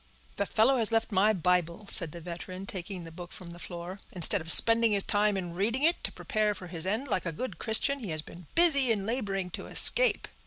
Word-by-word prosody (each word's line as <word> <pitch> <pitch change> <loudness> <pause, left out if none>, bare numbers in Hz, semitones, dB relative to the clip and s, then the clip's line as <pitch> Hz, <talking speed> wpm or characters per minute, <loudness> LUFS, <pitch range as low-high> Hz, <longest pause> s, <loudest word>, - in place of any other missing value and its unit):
"The 200 - -2
fellow 245 +5 +1
has 225 -1 +5
left 225 0 -2
my 200 +2 +2
Bible," 180 0 -2
said 170 -7 +1
the 170 - -11
veteran, 180 +3 -9
taking 185 -1 -7
he 165 - -11
book 175 +1 -12
from 175 -2 -12
the 175 - -13
floor. 175 +2 -9
"Instead 180 +2 +5
of 165 +1 +5
spending 230 +2 +5
his 200 -1 +2
time 205 -1 -1
in 175 -3 -7
reading 225 +9 -2
it 335 +3 0
to - - +2
prepare 215 -5 -3
for 185 - -11
his 170 0 -6
end 220 +8 -3
like 185 -7 -2
a - - -3
good 255 +11 -8
Christian, 275 +5 +3
he 220 -7 -8
has 155 -1 -2
been 170 0 -15
busy 280 -7 +4
in 200 -3 -3
laboring 200 -6 -4
to - - -9
escape." - - +3
195 Hz, 230 wpm, -27 LUFS, 175-225 Hz, -, has